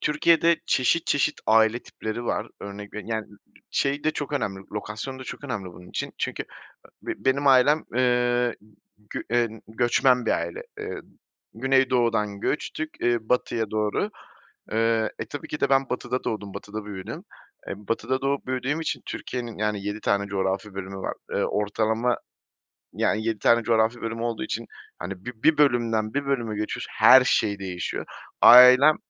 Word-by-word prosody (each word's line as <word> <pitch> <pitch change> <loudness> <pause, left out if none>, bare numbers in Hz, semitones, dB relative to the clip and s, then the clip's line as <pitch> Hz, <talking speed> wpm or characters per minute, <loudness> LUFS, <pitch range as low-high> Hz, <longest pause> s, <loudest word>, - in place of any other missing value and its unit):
Türkiye'de 165 +2 +3
çeşit 145 +6 +2
çeşit 145 +1 +1
aile 110 +2 +4
tipleri 110 +2 -6
var. - - -1
Örnek 100 0 -8
veri 105 - -7
yani, 110 -1 -2
ı 105 - -18 0.3
şey, 140 +1 0
de 155 - +3
çok 150 -1 -5
önemli, 100 -9 -2
lokasyon 105 +5 -5
da 130 - -8
çok 145 - -8
önemli 120 -8 -4
bunun 90 +1 -13
için - - -4
çünkü, - - -3 0.4
ııı, - - -28 0.2
be - - -20
benim 140 +2 +2
ailem, 140 +3 +5
ııı, 125 -1 +2 0.6
gü - - -4
eee, 120 0 +2 0.2
göçmen 120 +2 +2
bir - - +2
aile. 85 0 -2 0.2
Iıı, - - -5 0.5
Güneydoğu'dan 120 -5 +1
göçtük, 155 +4 -2
ııı, 120 0 +3
batıya 115 -3 0
doğru, 110 - -1 0.6
eee. 115 0 +1
E, - - -3
tabii 145 - -7
ki 150 - -5
de 140 - +1
ben 135 0 +3
Batı'da 125 0 -2
doğdum, 105 -3 -4
Batı'da 105 +1 -6
büyüdüm. 100 -3 -7 0.4
Eee, - - -3
Batı'da 115 +5 -2
doğup 140 0 -1
büyüdüğüm 130 +4 -1
için 160 - -3
Türkiye'nin, 120 -4 -5
yani, 105 -1 -1
7 105 +1 -3
tane 100 -1 +1
coğrafi 95 0 -2
bölümü 95 0 -6
var, 95 - -4 0.2
ııı, - - +1
ortalama, 110 +3 0 0.7
yani, 110 +1 0
7 110 -2 0
tane 115 +3 +4
coğrafi 115 +1 +2
bölümü 115 0 -4
olduğu 115 -1 -2
için, - - -4 0.3
hani, 95 +1 -7
bi 120 -2 -8
bir 160 -2 +4
bölümden 115 -6 +2
bir 140 0 -1
bölüme 120 -6 -1
geçiyorsun, 105 0 -4
her 130 0 +8
şey 105 -5 +1
değişiyor. 95 -2 -4 0.3
Ailem 130 +5 +9
115 Hz, 165 wpm, -25 LUFS, 105-130 Hz, 0.7 s, Ailem